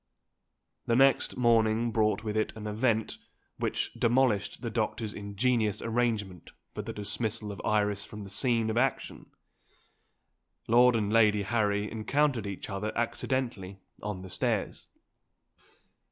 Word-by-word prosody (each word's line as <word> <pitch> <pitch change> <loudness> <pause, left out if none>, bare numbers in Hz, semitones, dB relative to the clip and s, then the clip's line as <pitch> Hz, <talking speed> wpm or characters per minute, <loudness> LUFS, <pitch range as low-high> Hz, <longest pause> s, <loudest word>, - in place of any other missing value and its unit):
The 115 - +2
next 135 0 +3
morning 115 -1 +3
brought 110 -1 +1
with 105 -1 -3
it 110 - 0
an 105 - -7
event, 110 +1 0 0.4
which - - -1
demolished 120 -3 +1
the 115 - -3
doctor's 110 -1 -2
ingenious 105 +1 0
arrangement 110 -6 -2 0.2
for 105 - -4
the 110 +2 -6
dismissal 105 0 -2
of 100 - -8
Iris 105 -1 +1
from 105 -1 -9
the 95 - -10
scene 115 0 +1
of 110 - -3
action. 135 +2 -1 1.4
Lord 120 +1 +5
and 105 -1 0
Lady 105 -2 +4
Harry 105 -1 0
encountered 120 0 0
each 100 -2 -6
other 105 +2 -3
accidentally 120 -5 -2 0.2
on 105 -3 -5
the 95 - -9
stairs. 90 - -2
110 Hz, 130 wpm, -29 LUFS, 105-120 Hz, 1.4 s, Lord